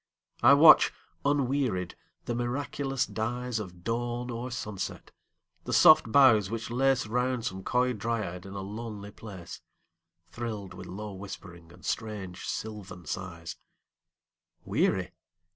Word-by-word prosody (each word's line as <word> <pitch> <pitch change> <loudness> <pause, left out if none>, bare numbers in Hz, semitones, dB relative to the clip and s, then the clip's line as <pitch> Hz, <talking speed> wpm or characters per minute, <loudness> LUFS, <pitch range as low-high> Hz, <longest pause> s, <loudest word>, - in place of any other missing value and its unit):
I 135 +4 +8
watch, 155 +2 +8 0.3
unwearied, 135 -9 +1 0.3
the 120 - -2
miraculous 135 +2 -1
dyesOf 110 -6 -4
dawn 120 +2 -2
or 120 +2 -4
sunset; 105 -5 -5 0.5
the - - -3
soft 110 - +7
boughs 110 -7 +6
which 115 +1 -4
laceRound 125 -1 +1
some 95 -3 -3
coy 125 +3 +2
dryad 105 -5 -3
in 100 - -9
a 100 - -4
lonely 105 0 -6
place, 95 -6 -10 0.6
Thrilled 105 +2 -6
with - - -9
low 105 +2 -6
whispering 90 -3 -9
and - - -15
strange 105 -5 -4
sylvan 100 -5 -6
sighs:Weary? 85 0 -5
110 Hz, 110 wpm, -29 LUFS, 95-125 Hz, 0.6 s, I